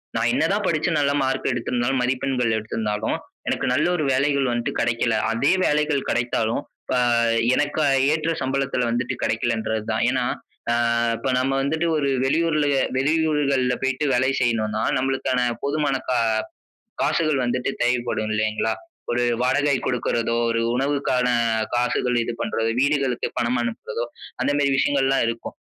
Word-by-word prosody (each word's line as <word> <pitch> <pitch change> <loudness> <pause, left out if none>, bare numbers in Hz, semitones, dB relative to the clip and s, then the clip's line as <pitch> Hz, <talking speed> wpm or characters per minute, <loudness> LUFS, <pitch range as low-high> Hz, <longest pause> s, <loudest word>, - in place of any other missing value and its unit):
நான் - - +1
என்ன - - +1
தான் - - -1
படிச்சு - - +1
நல்ல 140 -1 +2
மார்க் 135 0 0
எடுத்திருந்தாலும், 120 +1 -1
மதிப்பெண்கள் 125 -2 0
எடுத்திருந்தாலும், 110 0 -2 0.3
எனக்கு - - -1
நல்ல - - +2
ஒரு 160 - -1
வேலைகள் 140 0 +1
வந்துட்டு 120 0 -2
கெடைக்கல! 115 -1 +1 0.2
அப்டியே 135 +10 +2
வேலைகள் 150 -2 +1
கெடைத்தாலும் 120 -2 0 0.3
அ - - +2 0.6
எனக்கு 145 +3 0 0.3
ஏற்ற 155 +1 0
சம்பளத்துல 135 -1 0
வந்துட்டு 120 +1 -1
கெடைக்கலன்றது 110 -1 -1
தான். 110 - 0
ஏன்னா, 130 -1 0 0.5
அ - - +3 0.4
இப்ப 135 - -3
நம்ம 130 +1 +1
வந்துட்டு 160 +5 0
ஒரு 140 -2 0 0.2
வெளியூர்ல 155 +1 +1 0.3
வெளியூர்கள்ல 140 -3 +1
போயிட்டு 135 +2 0
வேலை 130 +2 +2
செய்யணுன்னா, 110 -2 0
நம்மளுக்கான 130 -1 0 0.2
போதுமான 145 -1 0
கா 125 - +2 0.9
காசுகள் 155 -5 +1
வந்துட்டு 125 +2 -1
தேவைப்படும் 120 -3 0
இல்லைங்களா? 110 +1 0 0.4
ஒரு 120 0 +1 0.2
வாடகை 145 +2 +2
குடுக்கறதோ, 115 -2 0 0.2
ஒரு 115 0 0 0.2
உணவுக்கான 135 -2 0 0.5
காசுகள் 125 0 +1
இது 115 - -3
பண்றதோ, 115 0 -1
வீடுகளுக்கு 140 -3 +1
பணம் 120 +1 +1
அனுப்புறதோ, 115 0 -4 0.4
அந்த 140 +3 +1
மேரி 140 -1 +2
விஷயங்கள்லாம் 135 -1 +2
இருக்கும். 115 0 -4
130 Hz, 135 wpm, -23 LUFS, 120-140 Hz, 0.9 s, அ